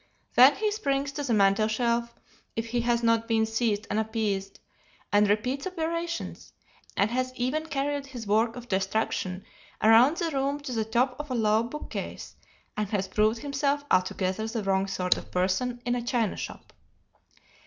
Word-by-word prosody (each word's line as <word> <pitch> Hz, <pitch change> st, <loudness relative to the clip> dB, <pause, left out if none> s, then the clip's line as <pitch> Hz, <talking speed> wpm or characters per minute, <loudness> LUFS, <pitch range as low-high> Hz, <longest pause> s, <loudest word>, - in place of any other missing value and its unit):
Then 260 Hz, +3 st, +8 dB
he 425 Hz, 0 st, 0 dB
springs 280 Hz, -10 st, -1 dB
to 285 Hz, +1 st, -4 dB
the 265 Hz, -, -2 dB
mantel 200 Hz, +1 st, +4 dB
shelf 235 Hz, +1 st, 0 dB, 0.4 s
if 225 Hz, 0 st, -3 dB
he 240 Hz, +1 st, 0 dB
has 235 Hz, 0 st, +1 dB
not 230 Hz, 0 st, +2 dB
been 225 Hz, -1 st, +2 dB
seized 220 Hz, -2 st, 0 dB
and 210 Hz, -, 0 dB
appeased, 210 Hz, -3 st, -2 dB, 0.5 s
and 205 Hz, 0 st, +5 dB
repeats 250 Hz, -, 0 dB
operations, 335 Hz, -1 st, -4 dB, 0.4 s
and 205 Hz, +3 st, +2 dB
has 255 Hz, +1 st, -1 dB
even 280 Hz, +6 st, -1 dB
carried 285 Hz, -1 st, -2 dB
his 245 Hz, -4 st, -7 dB
work 220 Hz, +3 st, +2 dB
of 245 Hz, -1 st, -9 dB
destruction 190 Hz, -1 st, -1 dB, 0.3 s
around 235 Hz, +8 st, +6 dB
the 335 Hz, -2 st, -1 dB
room 280 Hz, +1 st, -1 dB
to 285 Hz, -2 st, -6 dB
the 220 Hz, -2 st, 0 dB
top 250 Hz, +3 st, +1 dB
of 295 Hz, 0 st, -6 dB
a 255 Hz, -, -1 dB
low 215 Hz, -1 st, +3 dB
bookcase 240 Hz, +6 st, -6 dB, 0.4 s
and 210 Hz, -2 st, -2 dB
has 195 Hz, -2 st, -1 dB
proved 215 Hz, +3 st, +1 dB
himself 285 Hz, 0 st, 0 dB
altogether 185 Hz, +3 st, +1 dB
the 225 Hz, -1 st, -3 dB
wrong 195 Hz, 0 st, +1 dB
sort 180 Hz, -2 st, +1 dB
of -, -, -9 dB
person 215 Hz, +7 st, -1 dB
in 245 Hz, -, +1 dB
a 245 Hz, -, -1 dB
china 235 Hz, -3 st, 0 dB
shop. -, -, -8 dB
235 Hz, 170 wpm, -27 LUFS, 210-275 Hz, 0.5 s, Then